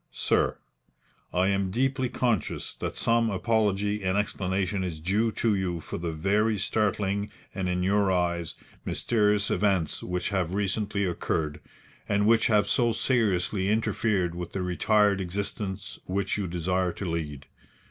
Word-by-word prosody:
"SIR, - - +1 0.7
I 90 +2 +2
am 100 -1 +1
deeply 130 +4 0
conscious 120 - -1
that - - -4
some 115 0 +2
apology 105 -1 +1
and 95 +1 +1
explanation 95 -1 -1
is 85 -4 -4
due 105 +7 +1
to 115 -2 +1
you 90 -3 -1
for 80 - -6
the 85 -1 -2
very 105 +7 +1
startling 100 0 0 0.2
and, 95 -1 -2
in 90 0 0
your 100 +1 +3
eyes, 85 -2 0 0.3
mysterious 105 -3 +1
events 95 -6 +1
which 90 0 -2
have 95 -3 -1
recently 100 0 0
occurred, 80 -4 -2 0.5
and 100 0 +2
which 115 +1 +4
have 105 -2 +3
so 120 -3 +2
seriously 100 -6 +1
interfered 105 -4 +1
with 90 0 -6
the 95 - -2
retired 100 +2 +2
existence 95 +1 -4
which 95 +1 -1
you 100 -2 -2
desire 90 +1 0
to 100 - -6
lead. 75 -5 -3
100 Hz, 145 wpm, -27 LUFS, 90-105 Hz, 0.7 s, which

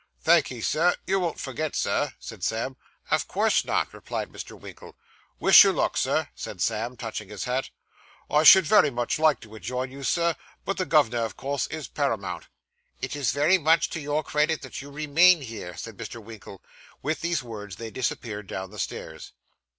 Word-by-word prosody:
'Thank'ee, 125 -3 +3
sir. 170 +9 +2
You 195 0 +1
won't 170 -4 -2
forget, 150 +3 -4
sir?' 145 -3 0
said 110 -5 -10
Sam. 115 +6 -2 0.4
'Of - - +1
course - - +2
not,' - - -1
replied - - -5
Mr. - - -9
Winkle. - - -12 0.4
'Wish - - +9
you - - +4
luck, - - 0
Sir,' - - +1
said - - -8
Sam, 115 +3 -1
touching 110 -3 -6
his 105 -2 -5
hat. 125 +2 -2 0.6
'I 150 - +3
should 190 +3 +9
very 150 - +5
much 120 +2 -2
liked 155 -5 +3
to 110 -1 -14
ha' - - -9
joined 125 +1 -3
you, 140 +1 -10
Sir; 170 +3 +1 0.3
but 195 - -2
the 185 -2 -1
gov'nor, 120 -7 +3
o' - - -3
course, 140 +1 -3
is 155 -3 -6
paramount.' 100 - -2 0.5
'It - - -4
is 140 -5 0
very 155 +7 +3
much 160 +1 +3
to 165 - -3
your 150 +1 -1
credit 150 +1 0
that 130 - -7
you 140 - -10
remain 155 +4 +4
here,' 110 -8 -7
said 115 -3 -8
Mr. 120 - -7
Winkle. 105 -3 -12 0.4
With 155 +3 -2
these 170 -4 -1
words 105 -5 -8
they 115 +1 -7
disappeared 110 -4 -4
down 95 0 -6
the 105 - -10
stairs. - - -6
135 Hz, 190 wpm, -26 LUFS, 115-155 Hz, 0.6 s, Wish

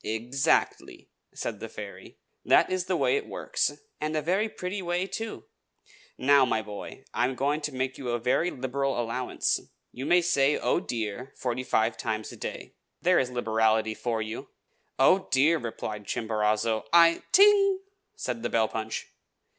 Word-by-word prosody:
"Exactly!" 120 +5 -1 0.2
said - - -5
the - - -6
fairy. - - -10 0.3
"That - - +4
is 185 -1 -1
the 185 -1 0
way 420 - +2
it 430 - -4
works, - - -1 0.3
and 155 +1 -2
a - - +1
very 195 +7 +1
pretty 190 0 -5
way, 175 +1 -1
too. 220 +3 -5 0.7
Now, 140 +1 +5
my 110 -4 +1
boy, 105 -1 -9
I 120 - +2
am 130 +1 -2
going 145 +4 0
to 150 - -3
make 130 0 -3
you 130 -3 -4
a 120 - +1
very 125 +9 +1
liberal 135 -1 -2
allowance. 120 +2 -1 0.3
You 130 +3 -6
may 175 +2 +5
say 145 -4 +3
'Oh, - - +1
dear!' 120 - -5
forty 125 0 -2
five 110 -2 +1
times 110 -1 -3
a - - -9
day. - - -7 0.3
There's 175 -8 +3
liberality 110 -2 +1
for 115 0 -2
you!" 110 +1 -7 0.5
"Oh, 180 +8 +4
dear!" 135 -2 +2
cried 105 -2 -6
Chimborazo, 110 0 0
"I 170 0 +6
" - - -38
"Ting!" 395 -1 +6 0.3
said 120 -2 -4
the 120 - -2
bell 110 -1 +2
punch. 110 0 -4
130 Hz, 165 wpm, -27 LUFS, 110-170 Hz, 0.7 s, I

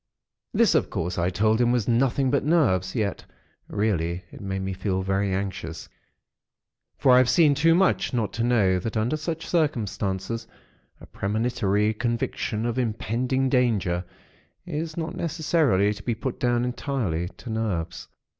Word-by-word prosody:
This, - - +4
of - - +2
course, 90 +2 -3
I 85 +1 +2
told 110 +5 +2
him 120 0 +3
was 120 -5 0
nothing 130 +2 +2
but 140 - +2
nerves; 130 - +2
yet, 105 -5 -1 0.4
really, 90 -4 -1
it - - -11
made 95 -1 -3
me 95 0 -3
feel 95 0 -2
very 95 +1 0
anxious; 95 -4 -4 1.1
for 130 - +4
I 125 - +8
have 130 -2 +3
seen 150 +2 +5
too 165 +4 +4
much, 190 +1 +2
not 115 -4 -1
to 115 - -1
know 105 -7 +3
that 110 +4 -3
under 115 +7 +1
such 160 +1 -4
circumstances, 115 - -1 0.5
a - - -12
premonitory 105 0 0
conviction 115 -1 -2
of 120 +1 -1
impending 125 +3 0
danger, 110 -9 +1 0.6
is 160 -1 -4
not 160 0 -3
necessarily 155 - +1
to - - -10
be 120 - -2
put 125 +2 -4
down 120 -1 +1
entirely 115 - -2
to 120 - -8
nerves. 105 -7 -3
115 Hz, 155 wpm, -25 LUFS, 95-130 Hz, 1.1 s, I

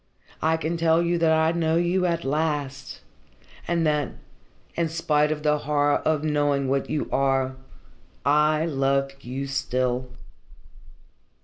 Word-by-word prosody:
I 160 +1 +2
can 160 +1 -2
tell 165 0 +3
you 170 0 0
that 165 -1 +3
I 160 0 +3
know 165 -1 0
you 175 +2 +1
at 170 -1 -1
last, 145 - -2 0.7
and 170 -1 +1
that, 150 -3 0 0.6
in 170 -1 -1
spite 150 -2 +1
of 150 -1 -3
the 150 -1 +2
horror 145 0 +1
of 155 -1 0
knowing 145 -2 +1
what 135 +1 -1
you 150 - -2
are, 135 -1 +1 0.7
I 150 +2 +3
love 135 -2 0
you 130 +3 -4
still." 130 -2 -1
150 Hz, 135 wpm, -24 LUFS, 135-160 Hz, 0.7 s, tell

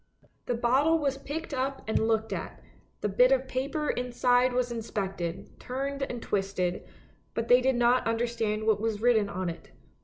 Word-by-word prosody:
The 245 - 0
bottle 265 +8 +3
was 275 -3 -1
picked 310 +3 -5
up 270 +1 -2
and 220 0 +1
looked 220 -1 0
at, - - -6 0.4
the - - +1
bit 250 +6 +4
of 265 0 +2
paper 280 +4 -1
inside 245 0 +2
was 245 0 0
inspected, 195 -6 -4
turned 275 +2 -4
and 250 -3 -3
twisted, 195 -3 -1 0.5
but 230 0 -2
they 245 +1 +7
did 265 0 +2
not 240 +1 +3
understand 225 -2 -1
what 215 -2 +2
was 220 -2 -1
written 220 -3 +3
on 185 -1 -3
it. 165 -1 -6
240 Hz, 165 wpm, -28 LUFS, 215-260 Hz, 0.5 s, they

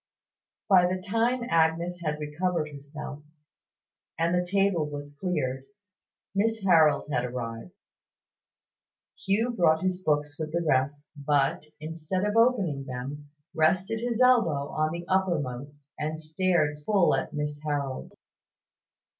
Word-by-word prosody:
By 180 -2 +6
the 185 +1 -1
time 230 +6 0
Agnes 165 0 +1
had 150 -1 -2
recovered 155 +1 -2
herself, 145 +1 -8 1.0
and 165 +1 +1
the 180 0 +2
table 185 -4 +1
was 145 0 -7
cleared, 135 -8 -2 0.7
Miss 220 +2 0
Harold 160 -7 +4
had 125 - +1
arrived. 120 +3 -5 1.4
Hugh 215 +5 0
brought 170 -7 +3
his 185 0 -1
books 145 -1 0
with 155 0 -4
the 170 0 0
rest, 140 +2 +1
but, 145 +1 +1
instead 160 +5 -3
of 210 +1 -1
opening 200 - +2
them, 135 +3 -6 0.2
rested 185 +8 +2
his 235 0 -2
elbow 230 - +4
on 155 0 0
the 170 +1 -5
uppermost, 145 -7 -1
and 155 +1 -2
stared 155 -2 0
full 195 -1 +3
at 135 - -1
Miss 150 0 -4
Harold. 140 -3 -3
155 Hz, 125 wpm, -27 LUFS, 145-185 Hz, 1.4 s, By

